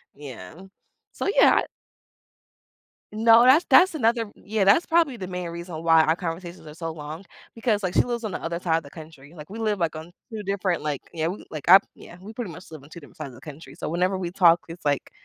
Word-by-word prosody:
Yeah. 130 -8 -10 0.6
So, - - -4
yeah, - - +7
I - - +2 1.5
No, 225 +2 +5
that's 275 +7 +6
that's 370 -1 +6
another 230 -5 0
Yeah, 210 -1 -2
that's 200 - +4
probably 325 -6 +2
the 190 -5 -6
main 180 -1 -5
reason 170 -1 -7
why 165 -1 +5
our 160 +1 +1
conversations 175 -1 -7
are 150 - -10
so 165 0 -5
long 155 +3 -9 0.3
because, 225 -3 -1
like, 180 -1 -3
she - - +4
lives 240 -1 -4
on 210 - -4
the - - -5
other 170 +1 -3
side 165 -2 0
of - - -8
the 140 - -14
country, 155 -1 -13
like, 150 +1 -12
we 215 - -8
live, 215 -3 -1
like, 165 -2 -1
on 160 +2 -9 0.2
2 215 -1 -5
different, 190 -4 -2
like 150 -3 -3
yeah, 165 -1 -2
we, 190 - -7
like, 155 +1 -7
I 190 +2 +10 0.2
Yeah, 175 - -14
we 210 +4 -10
pretty 225 -4 -6
much 165 +2 -12
live 155 -3 -11
on 140 - -16
2 170 - -11
different 145 - -17
sides - - -6
of 125 - -15
the - - -15
country, 150 +1 -11
so - - -6
whenever 180 +4 0
we 175 -2 -4
talk, 170 -2 +4
it's 165 0 -11
like, 145 -1 -1
175 Hz, 240 wpm, -24 LUFS, 160-210 Hz, 1.5 s, I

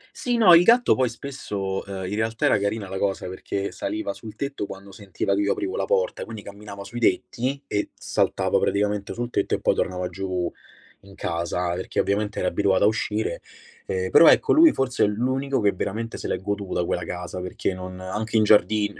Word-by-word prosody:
Sì, 245 -1 -1
no, 195 -7 +7
il 170 - +9
gatto 235 +7 +5
poi 130 -2 +1
spesso 105 -7 -4
uhm, 95 -1 -5
in 95 - -4
realtà 110 +1 -1
era - - +4
carina 100 0 -2
la 95 0 -5
cosa, 95 -2 -1
perché 100 +2 -4
saliva 315 +2 -3
sul 110 -2 -10
tetto 140 -7 -4
quando 100 +1 -10
sentiva 100 0 -3
che 100 - +1
io 100 - +2
aprivo 370 +6 -3
la - - -1
porta, - - 0
quindi 110 -3 -8
camminava 100 0 -9
sui 120 +5 -7
tetti, 130 +3 0
e 105 -4 -2
saltava - - 0
praticamente 105 0 0
sul 120 0 -4
tetto - - 0
e - - -5
poi - - +2
tornava 90 0 -2
giù, 90 -2 -3 0.6
in 100 0 -14
casa, 85 -1 -2
perché 90 +1 -3
ovviamente 105 +1 0
era 90 - 0
abituato 95 +1 +2
a - - +6
uscire, 110 0 -1 0.5
ehm, 95 0 -2
però 165 - +8
ecco, - - +5
lui 320 0 +7
forse 130 -2 0
è - - +5
l'unico 130 +6 -1
che 100 -1 +3
veramente 110 +5 -4
se - - -5
l'è - - -1
goduta 100 -2 -2
quella 90 - -2
casa, 90 +1 -5
perché 90 +1 -3
non 90 0 -8
anche 105 +5 -2
in 110 - +5
giardin 105 0 +3
105 Hz, 200 wpm, -24 LUFS, 95-120 Hz, 0.6 s, il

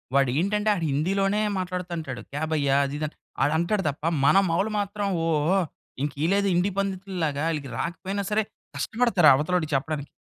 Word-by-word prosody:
వాడు 135 -2 +4
ఏంటంటే 210 +4 +1
ఆడు 175 -5 -2
హిందీలోనే 195 +8 +1 0.2
మాట్లాడతంటాడు. 175 -7 -4
క్యా 145 +3 -3
భయ్యా 140 -3 +2
అది 140 +1 -4
ఇది 155 - -1
అంట్ 150 - -12 0.3
ఆడు 145 +3 +2
అంటాడు 190 +4 0
తప్ప 145 +1 -7 0.2
మన 195 - +6
మౌలు 195 +6 +1
మాత్రం 205 0 -2 0.2
ఓహ్! 165 +4 +2 0.4
ఇంక 145 -1 -1
ఈళ్ళేదో 200 +4 +2
హిందీ 180 +3 +2
పండితుల్లాగా 185 -7 -2
ఈళ్ళకి 145 -3 -5
రాకపోయినా 195 +3 -3
సరే 215 +1 +2 0.3
కష్టపడతారు 225 -9 +3
అవతలోడికి 155 +2 0
చెప్పడానికి. 145 +1 -2
175 Hz, 160 wpm, -25 LUFS, 150-195 Hz, 0.4 s, మన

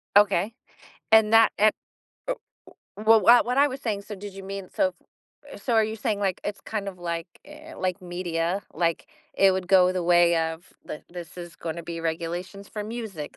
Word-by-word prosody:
Okay. 205 +1 +4 0.6
And 220 0 +6
that 225 0 +6
and 215 +1 +5 0.6
oh, - - +1 0.6
uh, 210 - -7
well, 220 0 +6
what 240 +5 +7
what 250 +2 -1
I 285 +1 +6
was 270 0 -7
saying, 205 -4 -2
so 210 - -7
did 200 0 -9
you 195 0 -9
mean, 195 -1 -6
so 285 -2 +1 0.6
eh, - - -8
so 240 - -2
are 220 -1 +5
you 220 +1 -4
saying, 210 -1 -1
like, 190 -2 -1
it's 205 0 -4
kind 205 -2 -4
of 180 -2 -8
like 170 -1 -3 0.2
eh, 305 +2 -12
like 185 +1 -2
media, 175 +1 -2
like, 170 0 -1 0.3
it 195 -1 +5
would 185 -1 -3
go 185 -1 +5
the 180 -1 -2
way 175 0 +4
of, 160 +1 -3
"Th 150 - -7
this 175 -2 -9
is 175 -1 -9
gonna 170 0 -5
be 165 0 -6
regulations 170 +4 -4
for 210 -1 -5
music, 215 -9 -6
195 Hz, 200 wpm, -25 LUFS, 175-215 Hz, 0.6 s, what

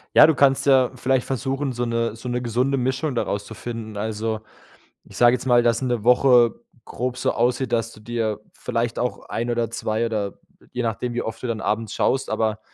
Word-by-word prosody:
Ja, - - +10
du 160 - +3
kannst 135 -1 +3
ja 130 -2 +4
vielleicht 130 0 +1
versuchen, 135 +1 -2
so 120 0 -2
'ne 115 -1 -1
so 115 +2 -7
'ne 125 0 -1
gesunde 125 +3 0
Mischung 130 +3 -1
daraus 100 -3 -2
zu - - -9
finden. 110 -2 -6
Also, 110 +1 -2 0.6
ich - - -14
sage 120 0 +6
jetzt 125 0 -4
mal, 120 -1 +5
dass 120 +1 +1
'ne 120 -4 -1
Woche 125 -1 +5 0.3
grob 125 +1 -3
so 125 +1 0
aussieht, 125 +2 0
dass 115 0 0
du 105 - -15
dir 110 -1 -2
vielleicht 115 0 -2
auch 125 - -3
ein 120 +1 -2
oder 120 -1 0
2 115 0 -1
oder 105 -3 -3 0.3
je 125 - -2
nachdem, 120 +1 -2
wie 120 - -1
oft 110 - -6
du - - -2
dann 115 -2 -2
abends 110 +1 -2
schaust 130 - 0
aber 110 -1 0
120 Hz, 205 wpm, -23 LUFS, 115-125 Hz, 0.6 s, Ja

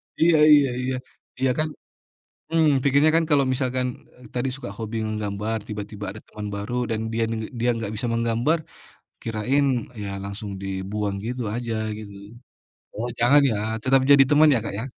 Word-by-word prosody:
Iya 165 -1 +4 0.2
iya 140 -2 +5
iya 130 0 -1 0.5
iya 130 - +3
kan. 155 - +2 0.9
Mmm, 160 -2 +4 0.2
pikirnya 140 +3 +5
kan, 165 - +3
kalau 140 -2 +4
misalkan, 130 -1 0 0.3
eee, 125 - -15
tadi 125 +2 0
suka 135 - -7
hobi 115 0 -5
menggambar, 105 +1 -2
tiba-tiba 105 0 -6
ada 110 - -10
teman 105 -1 -7
baru 100 +4 -4 0.2
dan 110 - -1
dia, 115 0 +1
ng 110 -1 -3 0.2
dia 120 +1 +3
nggak 110 -2 -4
bisa 120 +3 -2
menggambar. 115 +7 +1 0.6
Kirain, 120 +6 +1 0.4
ya, 100 - -4
langsung 100 +1 -6
dibuang 100 +1 -3
gitu 125 +2 -3
aja, 120 -1 -3 0.2
gitu. 105 -2 -9 0.8
Oh, 120 +3 -2
jangan 140 +5 +6
ya? 110 - 0 0.3
Tetap, 135 +1 +4
jadi 140 -1 +8
teman 150 +1 +6
ya, 125 - +4
Kak, 100 - -4
ya? 110 - -3
115 Hz, 170 wpm, -24 LUFS, 105-135 Hz, 0.9 s, jadi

